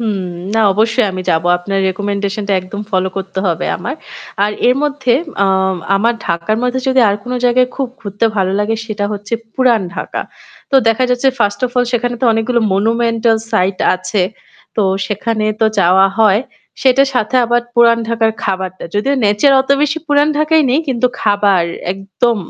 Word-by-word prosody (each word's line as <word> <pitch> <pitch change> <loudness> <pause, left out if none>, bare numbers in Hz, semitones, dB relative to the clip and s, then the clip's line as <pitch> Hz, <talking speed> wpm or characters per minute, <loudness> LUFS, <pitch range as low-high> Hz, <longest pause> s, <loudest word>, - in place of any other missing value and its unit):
হুম 215 -4 -1 0.4
না 225 - +2
অবশ্যই 220 +1 +1
আমি 185 - -4
যাব। 160 0 +1 0.2
আপনার 195 +2 -3
recommendation 200 +1 -3
টা - - +1
একদম 190 +3 -7
ফলো 190 -1 +1
করতে 190 0 -5
হবে 170 -2 -1
আমার। 270 - -5 0.5
আর 210 - -1 0.2
এর 250 - +4
মধ্যে 275 -4 0 0.3
আ - - +2 0.5
আমার 230 +4 +1
ঢাকার 170 +6 -1
মধ্যে 250 +1 0
যদি 260 0 +3
আর 200 - +1
কোন 250 - -6
জায়গায় 250 +1 +3
খুব 270 -2 -2
ঘুরতে 205 0 -3
ভালো 190 -1 +1
লাগে 220 +2 0
সেটা 210 -2 -3
হচ্ছে 205 +2 -8 0.2
পুরান 245 -5 +3
ঢাকা। - - -4 0.5
তো - - -2
দেখা 225 +3 +2
যাচ্ছে 250 +2 +2
first 205 0 0
of - - -10
all 245 - +3
সেখানে 245 0 0
তো - - 0
অনেকগুলো 230 +2 0
monumental 230 +2 +1 0.2
site 190 -2 +1
আছে, 185 +2 -2 0.5
তো 215 - +2 0.2
সেখানে 215 +1 -2 0.2
তো - - +4
যাওয়া 190 +3 +5
হয়, 210 -1 +4 0.4
সেটার 270 +1 +4
সাথে 250 0 -1
আবার 240 +1 +1
পুরাণ 235 -1 +5
ঢাকার 225 -1 +1
খাবারটা। 185 -1 -3
যদিও 265 +7 +1
nature 210 +7 +3
অত 265 +1 -4
বেশি 300 +2 0
পুরান 290 0 +3
ঢাকায় 310 +1 +3
নেই, 270 - +3
কিন্তু 250 -1 +1
খাবার 205 -4 +2 0.3
একদম 195 +5 -1
220 Hz, 175 wpm, -15 LUFS, 200-245 Hz, 0.5 s, যাওয়া